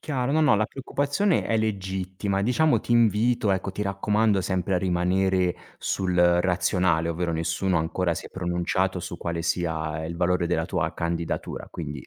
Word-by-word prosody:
chiaro. 135 -3 -2
No, 160 - +3
no, 145 -8 +5
la 105 +1 +1
preoccupazione 145 +8 0
è 115 - +1
legittima. 95 -2 -2
Diciamo 150 +7 +3
ti 120 - -2
invito, 115 0 +3
ecco, 95 0 -1
ti 105 - -6
raccomando 105 +1 +1
sempre 95 0 -1
a - - +3
rimanere 90 0 +1 0.2
sul 95 -2 -1
razionale, 90 -1 +2
ovvero 85 +1 -1
nessuno 85 +2 0
ancora 85 +2 0
si - - -6
è - - -11
pronunciato 90 +1 -1
su 85 - -6
quale 85 0 -3
sia 80 -2 -2
il 85 +1 -5
valore 90 0 +1
della 90 - 0
tua - - -1
candidatura. 85 0 -3
Quindi, 75 -5 -6
95 Hz, 165 wpm, -25 LUFS, 85-105 Hz, 0.2 s, no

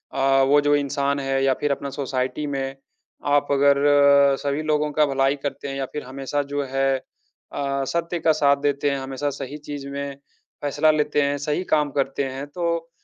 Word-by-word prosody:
अ, 135 0 +3
वो 145 +1 +5
जो 145 0 +3
इंसान 140 0 0
है 135 0 0
या 135 -1 +4
फिर 145 -1 0
अपना 140 0 -3
सोसाइटी 135 +1 -3
में 135 -1 -3 0.5
आप 145 0 +2
अगर 140 0 +4 0.6
सभी 140 +1 -1
लोगों 150 -1 0
का 150 0 +4
भलाई 135 0 +1
करते 145 0 -4
हैं 135 - -4
या 135 -1 -2
फिर 150 - -4
हमेशा 135 +2 -3
जो 145 0 0
है 135 0 0 0.6
अ, 140 -1 -2
सत्य 170 +3 -2
का 160 - +3
साथ 140 -2 +3
देते 145 0 +1
हैं, 140 - -1
हमेशा 135 +2 -3
सही 140 +1 -6
चीज़ 145 -2 -7
में 140 0 -5 0.5
फैसला 145 +2 +3
लेते 150 -1 +1
हैं, 140 0 0
सही 150 +5 -2
काम 150 -2 +2
करते 135 0 -1
हैं, 135 +1 -5
तो 170 +1 -2
140 Hz, 190 wpm, -23 LUFS, 135-145 Hz, 0.6 s, वो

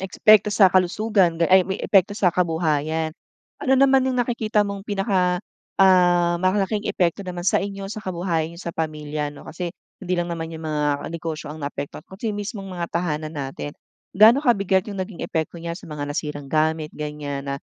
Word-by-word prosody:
epekto 210 +2 +4
sa 200 -3 +6
kalusugan 185 -1 +2
ay 185 0 +6
may 190 +2 -4
epekto 195 0 +3
sa 200 -3 +2
kabuhayan. 160 -2 0 0.5
Ano 265 - +3
naman 270 0 +5
yung 260 - 0
nakikita 225 -3 0
mong 200 -1 -5
pinaka, 195 -3 +1 0.4
ah, 175 -2 +5
malaking 195 +3 0
epekto 180 +1 0
naman 180 -1 -5
sa - - +3
inyo, 195 0 -5
sa 215 0 -7
kabuhayan 170 -3 -2
niyo 170 - -11
sa 170 - -5
pamilya 150 -2 -3
'no? 145 - -13
Kasi 170 +1 -5 0.3
hindi 180 - -2
lang 175 - -3
naman 165 -1 -4
yung 160 - -8
mga 150 -2 -1
negosyo 160 -2 -5
ang 155 - -8
naapektuhan 140 +1 -6
kasi 195 +4 -5
mismong 205 -1 -5
mga 175 -2 -3
tahanan 155 -3 -2
natin. 140 0 -5 0.4
Gaano 220 +6 +7
kabigat 195 -5 +2
yung 195 - -5
naging 185 -1 -5
epekto 160 +1 -3
niya 170 0 -5
sa 170 - -11
mga 150 -1 -4
nasirang 145 -1 -4
gamit, 155 +1 0
ganyan, 150 -2 -5
na 140 - -2
175 Hz, 175 wpm, -23 LUFS, 155-195 Hz, 0.5 s, Gaano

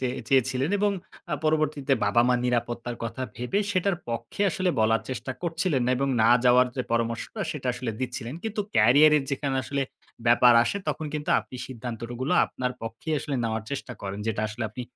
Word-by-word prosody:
চেয়ে 125 0 -4
চেয়েছিলেন 130 +2 +2
এবং 205 0 +2 0.4
আ - - +3
পরবর্তীতে 155 -3 +1
বাবা-মা 120 +4 +3
নিরাপত্তার 120 0 -1
কথা 115 +3 -4
ভেবে 125 - -1
সেটার 195 -1 +1
পক্ষে 115 - -3
আসলে 185 -1 0
বলার 110 +1 +3
চেষ্টা 130 0 -4
করছিলেন 165 -5 0
না - - +2
এবং 135 +2 0
না 115 - +5
যাওয়ার 125 0 +6
যে 130 - 0
পরামর্শটা 115 - -2
সেটা 150 -4 -5
আসলে 120 -1 -3
দিচ্ছিলেন। 125 0 -4
কিন্তু 220 -1 -2 0.2
ক্যারিয়ারের 145 +7 +6
যেখানে 140 -1 -1
আসলে 140 +1 -2 0.4
ব্যাপার 120 +1 +7
আসে 160 - -1
তখন 155 - -2
কিন্তু 150 -1 -2
আপনি 130 - -11
সিদ্ধান্ত 120 -2 -6
রো 120 - -6
গুলো 135 +6 0
আপনার 125 -1 -3
পক্ষেই 115 +8 -4
আসলে 140 0 -4
নেওয়ার 110 -1 -1
চেষ্টা 135 -2 -4
করেন। 100 0 -4
যেটা 110 -1 -1
আসলে 110 +3 -6
আপনি 125 +3 -6
125 Hz, 180 wpm, -26 LUFS, 115-150 Hz, 0.4 s, ব্যাপার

